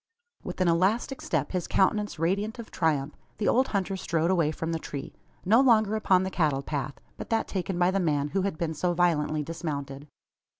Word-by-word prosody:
With - - -6
an 185 - +3
elastic 195 +10 +1
step - - -1
his 180 -2 -2
countenance 205 +1 +1
radiant 200 +8 -1
of 235 -2 -9
triumph 150 -4 0 0.2
the 210 - -1
old 260 +2 +3
hunter 195 -1 -1
strode 170 -2 0
away 170 -5 +2
from 160 +1 -3
the 165 - -1
tree, 140 -3 -7 0.3
no 220 +7 +5
longer 220 -5 +4
upon 190 -4 +3
the 190 - -3
cattle 150 -6 +1
path, 140 -1 -3 0.2
but - - -8
that 225 -1 0
taken 190 -1 -3
by 175 +1 +3
the 195 - 0
man 150 -5 0
who 195 +5 0
had 190 -4 -2
been 165 -2 -2
so 175 +2 -1
violently 155 -3 +1
dismounted. 145 -3 -5
175 Hz, 200 wpm, -27 LUFS, 155-195 Hz, 0.3 s, no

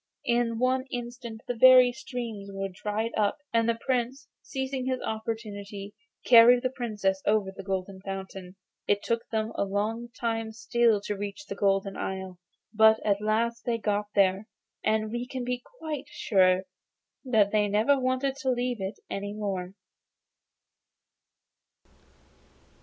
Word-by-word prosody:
In 235 -1 +1
one 255 +2 +1
instant 240 -2 -6
the 245 - -1
very 255 +1 +8
streams 235 -6 -6
were 195 0 -3
dried 210 +4 -3
up, 205 -1 +1 0.2
and 230 0 +3
the 230 - +1
Prince, 255 +1 -1
seizing 265 -1 -3
his 260 -1 0
opportunity, 210 -3 -5 0.3
carried 245 +1 +8
the 255 - 0
Princess 210 -7 -1
over 205 -2 +2
the 195 - -9
Golden 190 0 -4
Fountain. 190 -1 -7 0.3
It 205 0 +2
took 230 0 -1
them 220 0 -1
a - - 0
long 210 +4 -2
time 225 -2 -2
still 225 -1 +2
to 205 - -3
reach 205 +8 -6
the - - -5
Golden 195 -1 +1
Isle, 190 -2 -5 0.3
but 220 0 +6
at 200 -1 +2
last 230 +2 0
they 235 -1 0
got 210 -1 -1
there, 195 +1 +3 0.4
and 215 0 +1
we 240 +1 -3
may 255 -2 -3
be 250 0 -2
quite 310 - -6
sure 185 -8 +2 0.6
they 215 -4 +3
never 220 +7 +3
wanted 260 +1 0
to 265 -1 -2
leave 245 -3 -1
it 190 +2 -4
any 200 +1 -4
more. 195 -3 -4
220 Hz, 140 wpm, -28 LUFS, 200-245 Hz, 0.6 s, very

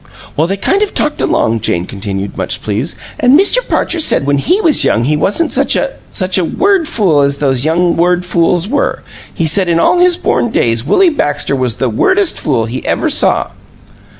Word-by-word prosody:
"Well, 160 +3 +1
they 195 +2 -3
kind 390 - 0
of 420 - -2
talked 300 - -1
along," 115 +1 0
Jane 85 -4 -1
continued, 100 0 -6
much - - -2
pleased; 110 +9 -3 0.2
"an' 265 0 +4
Mr. 395 +7 +3
Parcher 345 - -1
said 300 - +2
when 140 0 +1
he 360 - +1
was 325 -6 +3
young 115 - +1
he 150 +5 0
wasn't 205 - 0
any - - -2
such - - +2
a - - -1 0.2
such 185 -1 -1
a - - 0
word 385 - 0
fool 180 - +1
as 140 0 0
these 135 -2 0
young 170 +2 +1
word 180 +1 +1
fools 175 +1 0
were. 280 +5 -2 0.3
He 165 - -2
said 180 +3 +1
in 165 -1 +1
all 350 - +2
his 355 -1 +3
born 240 - 0
days 115 - 0
Willie 375 - +3
Baxter 145 - -1
was 125 -4 -2
the 130 - -1
wordest 375 - +1
fool 120 -6 -1
he 120 +3 -6
ever - - -1
saw!" - - +1
170 Hz, 205 wpm, -12 LUFS, -, 0.3 s, an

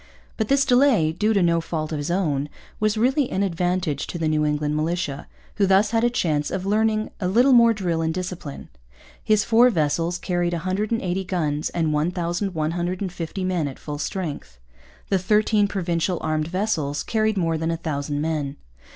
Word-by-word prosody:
But 220 - -1
this 275 +2 +3
delay, 245 - +4
due 210 +7 0
to 200 -4 +3
no 170 -1 +2
fault 160 -1 -4
of 155 - -2
his 145 +3 -3
own, 150 -6 0 0.3
was 215 0 +1
really 260 +4 +2
an 195 - 0
advantage 175 -4 -1
to - - -5
the 165 -1 -1
New 155 -1 +1
England 150 0 0
militia, 155 -2 -2 0.3
who 200 -2 +3
thus 195 +3 +4
had 225 0 +1
a 240 - +4
chance 155 -11 0
of 190 0 -3
learning 215 +1 +1
a 185 - -1
little 245 +8 +4
more 235 -1 +7
drill 180 -6 -1
and 160 0 0
discipline. 180 -4 -6 0.5
His 215 0 +3
four 235 +2 +5
vessels 165 -1 0
carried 175 -1 -1
180 185 +2 -1
guns 155 -5 -1
and 160 -3 0
1,150 175 +2 -2
men 180 -5 0
at 135 - -7
full 145 -1 -6
strength. 145 - -5 0.5
The 195 - +2
thirteen 210 +2 +2
Provincial 175 -2 -1
armed 155 0 -1
vessels 170 -6 -1
carried 220 -1 0
more 165 -3 0
than 160 +1 -1
1,000 150 -3 -2
men. 150 -3 -2
175 Hz, 170 wpm, -23 LUFS, 155-205 Hz, 0.5 s, more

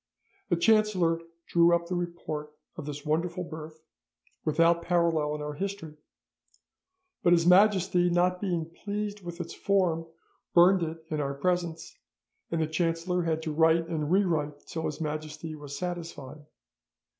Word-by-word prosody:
The - - +3
chancellor 185 -4 +3 0.2
drew 170 0 +4
up 170 0 -2
the 175 - -4
report 170 -4 -4 0.2
of 155 -4 -7
this 145 0 -6
wonderful 170 +4 -1
birth, 155 -1 -9 0.6
without 165 +2 +3
parallel 170 -4 +1
in 150 - -5
our 150 0 -4
history; 190 -2 -5 1.3
but 175 - +5
His 170 -1 +3
Majesty 185 -1 +5
not 180 +1 +2
being 175 -5 -1
pleased 205 +4 -5
with 175 0 -7
its 175 - -5
form, 175 -5 +1 0.5
burned 180 +2 +6
it 160 0 -4
in 155 -1 -1
our 140 -1 -2
presence, 170 +2 -2 0.5
and 165 - -1
the 160 - +2
chancellor 165 +2 0
had 160 -1 -1
to 155 -1 -3
write 165 +1 +3
and 155 -2 -2
rewrite 160 -7 +1
till 160 -1 -4
His 150 0 -5
Majesty 155 +1 -4
was 145 -2 -8
satisfied. 165 -5 -6
165 Hz, 145 wpm, -28 LUFS, 155-180 Hz, 1.3 s, burned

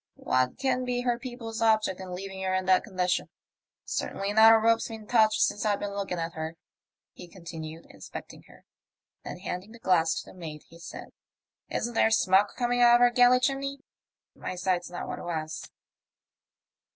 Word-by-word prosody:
What 130 0 0
can 265 -2 0
be 250 -1 -1
her 245 -1 0
people's 240 -3 -6
object 215 -4 +2
in 185 -1 -6
leaving 195 +1 -7
her 185 0 0
in 185 0 -1
that 185 -1 +4
condition? 185 -3 -1 0.6
Certainly 200 +1 -3
not 220 +1 +8
a 225 - +7
rope's 230 +1 +2
been 225 -2 -9
touched 220 -1 +3
since 205 - +1
I've 205 -2 +1
been 205 -1 -4
look 200 -1 -4
ing 180 - -1
at 165 0 -3
her," 160 +1 -5 0.6
he - - -11
continued, 165 -2 -9
inspecting - - -10
her; - - -19 0.6
then - - -7
handing 190 +5 -6
the - - -12
glass 175 -7 +2
to - - -6
the - - -17
mate, 155 -4 -8
he 165 - -16
said, 170 - -9 0.3
" - - -57
Isn't 240 - -3
there 225 - +4
smoke 200 -2 +3
coming 245 0 +1
out 240 0 +7
of 240 - +3
her 245 0 +6
galley 245 0 +5
chimney? 275 +1 -1 0.5
My - - -6
sight's 180 -1 -1
not 175 - -6
what - - -5
it - - -8
was." 160 -2 -4
200 Hz, 190 wpm, -28 LUFS, 180-235 Hz, 0.6 s, not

